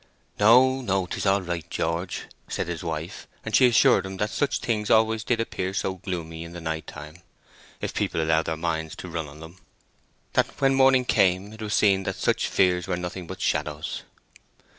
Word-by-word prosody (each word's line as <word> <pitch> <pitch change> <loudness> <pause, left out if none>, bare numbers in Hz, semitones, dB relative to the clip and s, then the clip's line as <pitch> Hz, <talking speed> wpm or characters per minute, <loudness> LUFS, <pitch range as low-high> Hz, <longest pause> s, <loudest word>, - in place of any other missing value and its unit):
"No, 130 +5 +6
no. 95 -5 0
'Tis - - -3
all 100 0 +3
right, 85 -2 -4
George," 85 +3 -2 0.2
said - - -3
his 85 -1 -4
wife; 80 0 -5 0.2
and - - -1
she 130 - +7
assured 120 -3 +5
him 95 0 -6
that 105 +2 -1
such 145 - 0
things 105 -3 -2
always 110 0 +3
did 120 -1 0
appear 95 -4 -3
so 95 -2 -1
gloomy 85 -3 -5
in 85 0 -10
the 85 - -7
night 80 -1 -4
time, 75 +1 -10 0.6
if - - -3
people - - -1
allowed 80 0 +2
their 80 -1 -2
minds 80 -1 -2
to - - -8
run 80 -2 -4
on 70 +2 -13
them; 80 +3 -12 0.7
that - - 0
when 135 0 +3
morning 130 -1 +5
came 95 -1 +2
it 110 - -11
was 105 -1 -1
seen 100 -2 +4
that - - -2
such - - 0
fears 90 -1 +2
were 90 -2 -1
nothing 90 0 -5
but - - -7
shadows. 75 0 -2
90 Hz, 195 wpm, -25 LUFS, 80-105 Hz, 0.7 s, she